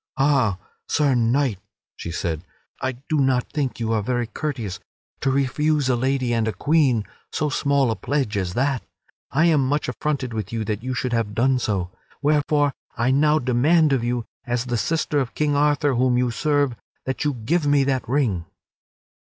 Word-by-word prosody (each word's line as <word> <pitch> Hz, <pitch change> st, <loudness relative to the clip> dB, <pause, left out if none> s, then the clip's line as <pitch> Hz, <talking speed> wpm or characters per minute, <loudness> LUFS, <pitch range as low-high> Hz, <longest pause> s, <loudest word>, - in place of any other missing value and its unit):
"Ha, 135 Hz, -8 st, +3 dB, 0.3 s
Sir 145 Hz, -3 st, +2 dB
Knight," 120 Hz, -2 st, +1 dB, 0.4 s
she -, -, -7 dB
said, 80 Hz, -1 st, -3 dB, 0.4 s
"I 130 Hz, -, -1 dB
do 155 Hz, -2 st, +1 dB
not 130 Hz, -2 st, +1 dB
think 140 Hz, -5 st, -2 dB
you 115 Hz, -1 st, -1 dB
are 110 Hz, -, +1 dB
very 120 Hz, +3 st, -1 dB
courteous 115 Hz, -, -4 dB, 0.4 s
to 135 Hz, -, 0 dB
refuse 140 Hz, +1 st, +1 dB
a 125 Hz, -, +3 dB
lady 130 Hz, 0 st, 0 dB
and 115 Hz, -1 st, +1 dB
a 110 Hz, -, -1 dB
queen 135 Hz, -, +2 dB, 0.3 s
so 155 Hz, -1 st, 0 dB
small 140 Hz, -3 st, +2 dB
a -, -, -1 dB
pledge 135 Hz, -6 st, -1 dB
as 90 Hz, -3 st, -2 dB
that. 135 Hz, 0 st, +1 dB, 0.5 s
I 155 Hz, +5 st, +2 dB
am 155 Hz, -5 st, +4 dB
much 145 Hz, +1 st, 0 dB
affronted 130 Hz, -1 st, -2 dB
with 110 Hz, -4 st, -4 dB
you 115 Hz, -2 st, -2 dB
that 105 Hz, 0 st, -2 dB
you 130 Hz, +1 st, -3 dB
should 125 Hz, -1 st, -2 dB
have 110 Hz, -3 st, -1 dB
done 130 Hz, +2 st, +3 dB
so. 95 Hz, -6 st, -1 dB, 0.3 s
Wherefore, 145 Hz, -1 st, +2 dB, 0.2 s
I 120 Hz, +3 st, +2 dB
now 150 Hz, +3 st, +4 dB
demand 145 Hz, +4 st, +3 dB
of 130 Hz, -3 st, +1 dB
you, 120 Hz, -1 st, -1 dB, 0.2 s
as 120 Hz, 0 st, -1 dB
the 120 Hz, -1 st, -2 dB
sister 155 Hz, +3 st, 0 dB
of 130 Hz, -3 st, -3 dB
King 150 Hz, -1 st, +1 dB
Arthur 145 Hz, 0 st, +2 dB
whom 125 Hz, 0 st, +2 dB
you 125 Hz, -1 st, +1 dB
serve, 145 Hz, -1 st, +1 dB, 0.3 s
that 130 Hz, -, -2 dB
you 145 Hz, -2 st, 0 dB
give 145 Hz, +8 st, 0 dB
me 145 Hz, -1 st, +4 dB
that 135 Hz, -3 st, -1 dB
ring." 120 Hz, -, +1 dB
130 Hz, 185 wpm, -23 LUFS, 115-145 Hz, 0.5 s, am